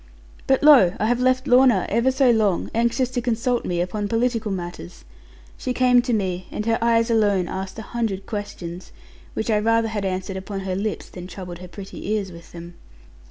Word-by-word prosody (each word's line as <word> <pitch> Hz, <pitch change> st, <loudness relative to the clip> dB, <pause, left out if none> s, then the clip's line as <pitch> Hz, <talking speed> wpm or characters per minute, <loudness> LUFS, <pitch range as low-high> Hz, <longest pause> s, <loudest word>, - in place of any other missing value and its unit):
But 265 Hz, +1 st, +2 dB
lo! 260 Hz, -13 st, +7 dB
I -, -, +1 dB
have 240 Hz, +2 st, +1 dB
left 255 Hz, +1 st, +2 dB
Lorna 245 Hz, -7 st, +5 dB
ever 235 Hz, +5 st, +2 dB
so 260 Hz, -1 st, +3 dB
long, 215 Hz, -5 st, +1 dB
anxious 235 Hz, +2 st, +1 dB
to 250 Hz, -1 st, -1 dB
consult 240 Hz, +1 st, 0 dB
me 175 Hz, -1 st, -1 dB
upon 205 Hz, +4 st, -2 dB
political 225 Hz, -1 st, 0 dB
matters. 175 Hz, -1 st, -7 dB, 0.5 s
She 255 Hz, -, -2 dB
came 250 Hz, -1 st, +5 dB
to 245 Hz, 0 st, -3 dB
me, 185 Hz, -5 st, -1 dB
and 210 Hz, -, -4 dB
her 225 Hz, 0 st, +1 dB
eyes 230 Hz, 0 st, +3 dB
alone 205 Hz, -5 st, +2 dB
asked 190 Hz, +2 st, -5 dB
a 220 Hz, -, -6 dB
hundred 215 Hz, -5 st, -3 dB
questions, 185 Hz, -4 st, -6 dB, 0.4 s
which 220 Hz, +1 st, -1 dB
I 210 Hz, -, +3 dB
rather 230 Hz, +1 st, +2 dB
had 210 Hz, -2 st, -3 dB
answered 190 Hz, 0 st, -3 dB
upon 195 Hz, +1 st, -5 dB
her 190 Hz, -1 st, -3 dB
lips 205 Hz, +2 st, -3 dB
than 180 Hz, 0 st, -9 dB
troubled 180 Hz, -2 st, -8 dB
her 180 Hz, -, -9 dB
pretty 195 Hz, +2 st, -8 dB
ears 205 Hz, -3 st, -1 dB
with 170 Hz, -1 st, -13 dB
them. 170 Hz, 0 st, -10 dB
215 Hz, 195 wpm, -22 LUFS, 190-240 Hz, 0.5 s, lo